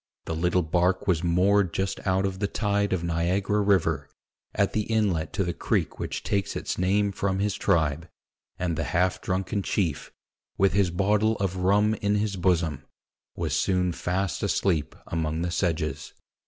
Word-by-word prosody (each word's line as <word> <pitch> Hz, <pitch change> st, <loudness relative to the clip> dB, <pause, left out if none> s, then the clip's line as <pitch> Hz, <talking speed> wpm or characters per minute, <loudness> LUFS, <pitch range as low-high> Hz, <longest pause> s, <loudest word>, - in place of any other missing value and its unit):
The -, -, -3 dB
little 90 Hz, +2 st, +1 dB
bark 90 Hz, +3 st, +1 dB
was 90 Hz, -3 st, +2 dB
moored 90 Hz, +1 st, +2 dB
just 95 Hz, 0 st, -1 dB
out 95 Hz, +1 st, +2 dB
of 95 Hz, -1 st, -3 dB
the 100 Hz, -, 0 dB
tide 100 Hz, -1 st, 0 dB
of 90 Hz, -2 st, 0 dB
Niagara 90 Hz, +5 st, 0 dB
river, 80 Hz, -8 st, +1 dB, 0.5 s
at -, -, +1 dB
the 110 Hz, -, +1 dB
inlet 100 Hz, -8 st, +1 dB
to 95 Hz, -, 0 dB
the 85 Hz, -1 st, -2 dB
creek -, -, -1 dB
which -, -, -4 dB
takes 100 Hz, -1 st, -1 dB
its -, -, -3 dB
name 100 Hz, +2 st, +2 dB
from 95 Hz, 0 st, -1 dB
his 100 Hz, +1 st, 0 dB
tribe, 80 Hz, -4 st, 0 dB, 0.5 s
and 90 Hz, -2 st, -1 dB
the 80 Hz, -, -1 dB
half 90 Hz, +1 st, +1 dB
drunken 95 Hz, +1 st, -1 dB
chief, 90 Hz, -6 st, -1 dB, 0.5 s
with 95 Hz, -2 st, +3 dB
his 100 Hz, -2 st, +3 dB
bottle 105 Hz, +5 st, +2 dB
of 95 Hz, -3 st, -2 dB
rum 100 Hz, +4 st, +3 dB
in 105 Hz, -1 st, 0 dB
his 105 Hz, -1 st, 0 dB
bosom, 85 Hz, -6 st, 0 dB, 0.5 s
was -, -, -1 dB
soon 90 Hz, -1 st, +1 dB
fast 90 Hz, +2 st, -2 dB
asleep 85 Hz, -7 st, 0 dB
among 80 Hz, 0 st, -2 dB
the 85 Hz, -, -2 dB
sedges. 85 Hz, -3 st, -2 dB
95 Hz, 170 wpm, -26 LUFS, 85-100 Hz, 0.5 s, with